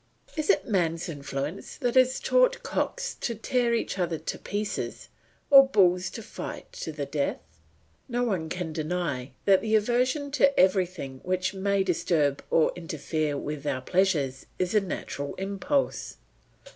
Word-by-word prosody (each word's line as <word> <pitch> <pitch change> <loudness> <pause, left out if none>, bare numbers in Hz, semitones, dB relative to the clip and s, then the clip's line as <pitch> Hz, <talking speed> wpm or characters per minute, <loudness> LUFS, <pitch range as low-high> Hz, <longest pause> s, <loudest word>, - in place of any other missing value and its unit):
Is 310 -2 -2
it - - +4
man's 175 -5 0
influence 145 +2 -5
that 245 -4 0
has 255 0 +4
taught - - +3
cooks - - -2
to 235 - -1
tear 235 +2 +1
each 225 - -2
other 170 -2 0
to - - -5
pieces 205 0 -4 0.4
or 275 -1 +10
bulls 180 -6 +3
to 225 - -8
fight - - -7
to 160 - -5
the 145 -2 -4
death? 140 0 -1 0.7
No 245 0 0
one 185 -9 -1
can 175 -3 -4
deny 155 -5 -2 0.2
that 195 -2 +5
the 220 +1 +1
aversion 250 +6 +1
to 280 -1 +3
everything 180 -8 +1
which 185 +1 -1
may 200 0 +1
disturb 160 -6 +1
or 160 - +4
interfere 155 -3 -2
with 150 0 -5
our 135 -2 -1
pleasures 145 -6 +1
is 180 +1 -1
a 210 - +5
natural 145 -6 -5
impulse. 200 +9 -1
185 Hz, 150 wpm, -27 LUFS, 155-230 Hz, 0.7 s, or